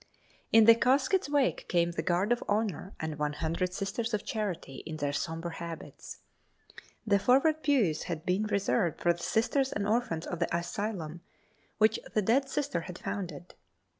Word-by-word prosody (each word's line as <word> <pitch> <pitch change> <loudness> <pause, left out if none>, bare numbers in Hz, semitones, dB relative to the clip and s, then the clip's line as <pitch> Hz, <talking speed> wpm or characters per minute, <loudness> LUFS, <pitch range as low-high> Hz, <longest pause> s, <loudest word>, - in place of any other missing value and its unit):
In 225 -1 +7
the 230 - +10
casket's 270 +9 +2
wake 285 -3 +1
came 170 -1 +2
the 170 - -2
guard 180 +6 +1
of 240 - +1
honor 205 -3 -1
and 155 -1 -4
one 150 0 0
hundred 165 +4 -1
Sisters 210 +4 -2
of 205 - -5
Charity 190 - -3
in 160 -1 -5
their 145 -2 -1
sombre 165 +3 -3
habits. 170 -1 -8 0.9
The 200 -2 +3
forward 285 +8 +3
pews 230 - +2
had 165 -3 -4
been 190 +4 +1
reserved 200 -4 0
for 175 - +3
the 170 - -11
Sisters 260 +8 +1
and 200 0 -2
orphans 210 -7 0
of 175 - -5
the 170 0 0
asylum, 175 -3 -4 0.6
which 220 +1 +3 0.2
the 215 - +3
dead 265 +7 +2
Sister 285 - -1
had 180 +1 -8
founded. 175 -3 -5
195 Hz, 165 wpm, -30 LUFS, 170-230 Hz, 0.9 s, the